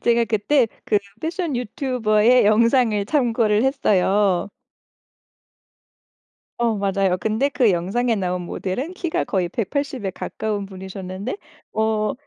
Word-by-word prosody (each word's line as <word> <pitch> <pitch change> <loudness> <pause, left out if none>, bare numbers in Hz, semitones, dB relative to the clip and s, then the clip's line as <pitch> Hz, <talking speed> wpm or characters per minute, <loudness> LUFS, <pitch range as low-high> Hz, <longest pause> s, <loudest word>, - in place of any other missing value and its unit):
제가 235 0 +3
그때 230 +4 +2 0.2
그 210 - +2 0.2
패션 330 -4 -2
유튜버의 245 -1 +2
영상을 225 0 +3
참고를 230 -6 +2
했어요. 205 -7 +2 2.1
어 235 -2 +1
맞아요. 195 -2 +1
근데 220 +8 0
그 255 -5 +3
영상에 195 +7 0
나온 180 -2 -2
모델은 225 - -4
키가 345 -3 -2
거의 185 -3 -1
180에 245 0 -3
가까운 205 -2 -4
분이셨는데 190 - -6 0.4
어 220 -1 0
215 Hz, 240 characters per minute, -22 LUFS, 195-250 Hz, 2.1 s, 제가